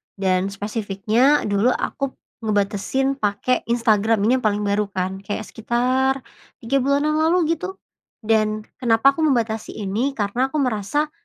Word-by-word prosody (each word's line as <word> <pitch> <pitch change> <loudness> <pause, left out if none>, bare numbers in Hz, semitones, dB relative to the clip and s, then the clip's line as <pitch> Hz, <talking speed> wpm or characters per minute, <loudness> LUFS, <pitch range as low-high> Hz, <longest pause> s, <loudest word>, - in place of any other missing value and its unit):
dan 190 -1 +1
spesifiknya 210 +6 +1
dulu 205 +2 +1
aku 275 -1 -3 0.2
ngebatasin 215 +6 0
pake 210 +4 0
Instagram. 225 -2 +2
Ini 250 +4 +3
yang - - -13
paling 205 0 0
baru 205 0 0
kan, 190 -1 -3
kayak 205 +2 -4
sekitar 255 +4 0 0.4
3 275 +4 +1
bulan 280 +2 +1
yang 305 - +1
lalu 325 +3 +3 0.2
gitu. 365 +4 -6 0.5
Dan 215 -1 +1 0.2
kenapa 240 +1 +4
aku 320 - -5
membatasi 225 -5 -1
ini, 220 +7 -2
karena 225 +4 0
aku 270 - -10
merasa 275 +2 0
225 Hz, 145 wpm, -22 LUFS, 205-265 Hz, 0.5 s, kenapa